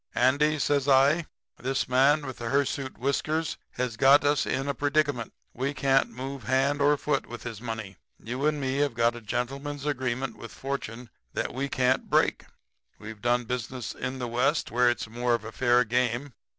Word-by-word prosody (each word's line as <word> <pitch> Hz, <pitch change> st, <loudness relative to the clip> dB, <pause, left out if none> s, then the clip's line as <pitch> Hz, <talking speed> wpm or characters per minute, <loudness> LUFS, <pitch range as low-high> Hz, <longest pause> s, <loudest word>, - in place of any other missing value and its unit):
"'Andy,' 145 Hz, +5 st, +3 dB
says 145 Hz, -1 st, +1 dB
I, 140 Hz, +4 st, +4 dB, 0.3 s
'this 135 Hz, +1 st, -1 dB
man 140 Hz, +4 st, +4 dB
with 130 Hz, -2 st, -6 dB
the 115 Hz, -1 st, -3 dB
hirsute 140 Hz, 0 st, -1 dB
whiskers 155 Hz, +4 st, -1 dB, 0.2 s
has 125 Hz, -3 st, -3 dB
got 135 Hz, +4 st, +6 dB
us 145 Hz, 0 st, +2 dB
in 135 Hz, +1 st, -1 dB
a 140 Hz, -, 0 dB
predicament. 145 Hz, -4 st, 0 dB, 0.2 s
We 135 Hz, +3 st, -2 dB
can't 135 Hz, -1 st, +3 dB
move 130 Hz, -1 st, -7 dB
hand 135 Hz, +3 st, +2 dB
or 145 Hz, +1 st, +4 dB
foot 140 Hz, -1 st, -1 dB
with 120 Hz, 0 st, -8 dB
his 115 Hz, -3 st, -6 dB
money. 110 Hz, -5 st, -5 dB, 0.2 s
You 125 Hz, +6 st, -2 dB
and 150 Hz, -1 st, 0 dB
me 135 Hz, -1 st, -1 dB
have 145 Hz, -4 st, +1 dB
got 115 Hz, 0 st, +2 dB
a 120 Hz, -, -8 dB
gentleman's 135 Hz, +6 st, -3 dB
agreement 130 Hz, -3 st, -2 dB
with 115 Hz, -, -9 dB
Fortune 125 Hz, -4 st, -5 dB, 0.2 s
that -, -, -2 dB
we 140 Hz, +2 st, -2 dB
can't 130 Hz, 0 st, +1 dB
break. -, -, +2 dB, 0.5 s
We've 110 Hz, 0 st, -9 dB
done 120 Hz, 0 st, +2 dB
business 125 Hz, 0 st, -4 dB
in 130 Hz, +1 st, -4 dB
the 125 Hz, -1 st, -3 dB
West 125 Hz, +6 st, +1 dB
where 125 Hz, +1 st, +4 dB
it's 120 Hz, -, -2 dB
more 120 Hz, +2 st, 0 dB
of 115 Hz, -, -5 dB
a 115 Hz, -, -6 dB
fair 120 Hz, +1 st, +3 dB
game. 125 Hz, +3 st, -1 dB
130 Hz, 185 wpm, -27 LUFS, 120-140 Hz, 0.5 s, got